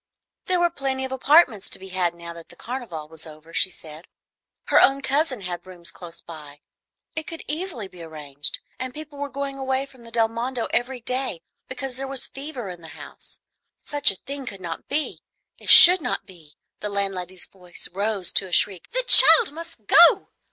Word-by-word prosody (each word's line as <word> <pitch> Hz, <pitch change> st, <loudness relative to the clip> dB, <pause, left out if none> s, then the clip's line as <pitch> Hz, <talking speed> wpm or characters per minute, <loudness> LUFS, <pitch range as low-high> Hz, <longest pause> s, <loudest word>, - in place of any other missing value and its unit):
There 365 Hz, -1 st, 0 dB
were 345 Hz, -1 st, +2 dB
plenty 270 Hz, -3 st, -3 dB
of 260 Hz, -, -7 dB
apartments 265 Hz, -, +3 dB
to -, -, -5 dB
be 190 Hz, 0 st, -11 dB
had 180 Hz, -2 st, -1 dB
now 170 Hz, 0 st, -9 dB
that 170 Hz, -1 st, -13 dB
the -, -, -15 dB
Carnival 230 Hz, -12 st, -7 dB
was 160 Hz, +1 st, -7 dB
over, 155 Hz, +1 st, -14 dB
she 185 Hz, -, +2 dB
said, 160 Hz, -1 st, -12 dB, 0.6 s
her -, -, +4 dB
own 275 Hz, 0 st, +3 dB
cousin 275 Hz, -4 st, 0 dB
had 180 Hz, -1 st, -6 dB
rooms 180 Hz, -1 st, -7 dB
close 170 Hz, -2 st, -11 dB
by, 150 Hz, -3 st, -12 dB, 0.5 s
it 315 Hz, -1 st, -3 dB
could 330 Hz, -, -8 dB
easily 305 Hz, -, -4 dB
be 180 Hz, -2 st, -14 dB
arranged, 150 Hz, -3 st, -4 dB, 0.2 s
and 255 Hz, 0 st, -6 dB
people 300 Hz, -2 st, -9 dB
were 285 Hz, 0 st, -4 dB
going 275 Hz, 0 st, -5 dB
away 265 Hz, 0 st, -1 dB
from 260 Hz, -3 st, -20 dB
the 230 Hz, -, -13 dB
Del 230 Hz, -1 st, +2 dB
Mondo 235 Hz, +2 st, -3 dB
every 245 Hz, +1 st, -1 dB
day 250 Hz, -8 st, -3 dB, 0.2 s
because 255 Hz, 0 st, -6 dB
there 270 Hz, 0 st, -5 dB
was 265 Hz, -1 st, -3 dB
fever 270 Hz, -5 st, -8 dB
in 175 Hz, -2 st, -9 dB
the 165 Hz, -, -11 dB
house. -, -, -12 dB, 0.5 s
Such 290 Hz, 0 st, +3 dB
a 195 Hz, -, +3 dB
thing 275 Hz, +6 st, -8 dB
could 200 Hz, -3 st, -6 dB
not 170 Hz, -3 st, -7 dB
be, 295 Hz, +2 st, -2 dB, 0.4 s
it -, -, -6 dB
should 360 Hz, 0 st, +10 dB
not -, -, -3 dB
be, 165 Hz, -6 st, -14 dB, 0.3 s
the 210 Hz, -, -3 dB
landlady's 190 Hz, -3 st, -3 dB
voice 180 Hz, -2 st, -7 dB
rose 200 Hz, -1 st, -1 dB
to 190 Hz, -, +1 dB
a -, -, -14 dB
shriek, 185 Hz, 0 st, +1 dB
"the -, -, -2 dB
child 475 Hz, -5 st, +7 dB
must 330 Hz, -9 st, -10 dB
go!" 360 Hz, -, +6 dB
230 Hz, 195 wpm, -23 LUFS, 175-275 Hz, 0.6 s, should